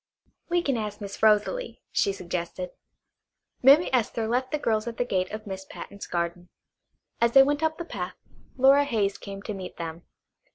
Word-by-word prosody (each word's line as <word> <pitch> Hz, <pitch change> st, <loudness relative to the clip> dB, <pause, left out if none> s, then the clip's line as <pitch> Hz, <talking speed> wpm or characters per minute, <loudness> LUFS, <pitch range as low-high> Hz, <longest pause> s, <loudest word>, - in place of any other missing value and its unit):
"We 345 Hz, 0 st, +2 dB
can 275 Hz, -6 st, +1 dB
ask 210 Hz, -2 st, -4 dB
Miss 200 Hz, -2 st, -7 dB
Rosalie," 220 Hz, -, +2 dB
she 200 Hz, -, +2 dB
suggested. 180 Hz, -1 st, -4 dB, 0.9 s
Mammy 280 Hz, +7 st, +7 dB
Esther 230 Hz, -2 st, +1 dB
left 250 Hz, +3 st, 0 dB
the 300 Hz, -, 0 dB
girls 220 Hz, -5 st, 0 dB
at 230 Hz, -, -5 dB
the 245 Hz, -, +1 dB
gate 185 Hz, -5 st, 0 dB
of 215 Hz, +1 st, -7 dB
Miss 190 Hz, -2 st, -6 dB
Patten's 200 Hz, +1 st, -9 dB
garden. 175 Hz, 0 st, -3 dB, 0.7 s
As 235 Hz, 0 st, +3 dB
they 270 Hz, -, +9 dB
went 290 Hz, +2 st, 0 dB
up 315 Hz, 0 st, +1 dB
the 340 Hz, -, -5 dB
path 180 Hz, -, -5 dB, 0.4 s
Flora 270 Hz, +2 st, +6 dB
Hayes 210 Hz, -7 st, 0 dB
came 195 Hz, -1 st, -8 dB
to 215 Hz, -, -4 dB
meet 190 Hz, -2 st, -7 dB
them. 165 Hz, 0 st, -5 dB
215 Hz, 175 wpm, -27 LUFS, 190-265 Hz, 0.9 s, they